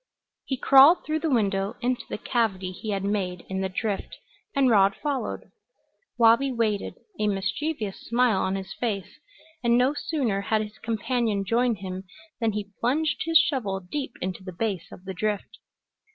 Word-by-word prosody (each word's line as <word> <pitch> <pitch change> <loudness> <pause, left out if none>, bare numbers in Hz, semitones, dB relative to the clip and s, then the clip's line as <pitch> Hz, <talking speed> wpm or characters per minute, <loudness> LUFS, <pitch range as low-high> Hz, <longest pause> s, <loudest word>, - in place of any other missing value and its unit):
He 265 - -2
crawled 275 +7 +7
through 310 0 0
the 320 - -1
window 200 -5 +1
into 245 0 0
the - - -3
cavity 195 -6 -1
he 200 +4 -7
had 195 -2 -1
made 190 -3 -1
in 190 0 -2
the 190 - -1
drift, 200 +1 -3 0.4
and 275 -1 +4
Rod 200 -4 +5
followed. 280 0 -3 0.7
Wabi 235 +4 +5
waited, 220 -4 -1 0.2
a 210 - +2
mischievous 210 +3 -2
smile 235 -4 +3
on 190 - 0
his 195 -1 -5
face, 205 -6 -4 0.4
and 235 0 +4
no 255 +3 +3
sooner 265 -10 -1
had 215 +1 +1
his 210 0 -10
companion 225 -2 -1
joined 230 -1 +1
him 190 0 -5 0.3
than 225 -3 +1
he 205 -1 -4
plunged 295 +7 0
his 330 0 +5
shovel 250 -11 +1
deep 245 +8 -5
into 185 +1 -4
the 185 - -6
base 190 -2 -3
of 185 - -12
the 190 - -4
drift. 205 +2 -3
215 Hz, 165 wpm, -26 LUFS, 195-250 Hz, 0.7 s, crawled